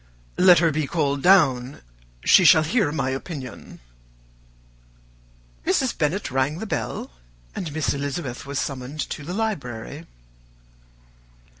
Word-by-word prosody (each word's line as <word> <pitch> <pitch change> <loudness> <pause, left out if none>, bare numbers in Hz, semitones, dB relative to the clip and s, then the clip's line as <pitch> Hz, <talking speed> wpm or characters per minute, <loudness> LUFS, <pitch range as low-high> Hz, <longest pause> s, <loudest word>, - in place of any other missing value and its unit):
"Let 180 -1 +7
her 165 -2 +3
be 155 -1 -1
called 140 -4 -1
down. 140 -8 +3 0.4
She - - +7
shall 155 - +7
hear 180 -1 +1
my 140 -4 -1
opinion." 135 -1 -7 1.8
Mrs. 260 -3 +1
Bennet 160 +2 -1
rang 135 +4 0
the 220 - -5
bell, 205 - -4 0.4
and 170 -5 -5
Miss 155 +1 -1
Elizabeth 140 -2 -4
was 140 0 -5
summoned 135 +3 -4
to 150 - -5
the 175 +5 -5
library. 150 - -4
150 Hz, 120 wpm, -23 LUFS, 135-175 Hz, 1.8 s, Let